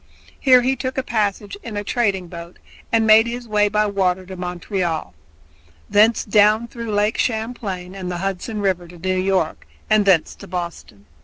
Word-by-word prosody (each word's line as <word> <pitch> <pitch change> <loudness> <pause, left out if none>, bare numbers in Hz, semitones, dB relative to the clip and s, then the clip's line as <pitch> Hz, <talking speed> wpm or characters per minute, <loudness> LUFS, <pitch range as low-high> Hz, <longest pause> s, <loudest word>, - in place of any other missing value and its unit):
Here 255 -2 +6
he 260 +2 +1
took 260 0 -4
a 265 - 0
passage 205 -3 -1
in 220 -3 -6
a 205 - -2
trading 200 -5 0
boat 170 0 -10 0.3
and 225 -1 +3
made 220 +1 +6
his 240 0 -5
way 210 -1 +2
by 210 +1 +2
water 190 -2 0
to 190 +1 -8
Montreal, 180 - -3 0.8
thence 220 +2 +4
down 215 +2 +4
through 230 -2 -6
Lake 210 +1 +1
Champlain 220 -6 -3
and 190 -2 -6
the 175 - -3
Hudson 195 +4 -3
River 185 -3 0
to 175 +1 -13
New 185 +2 -1
York, 185 -4 -1 0.2
and 215 -1 +5
thence 180 -5 +3
to 200 - -11
Boston. 170 - -6
200 Hz, 175 wpm, -21 LUFS, 180-220 Hz, 0.8 s, Here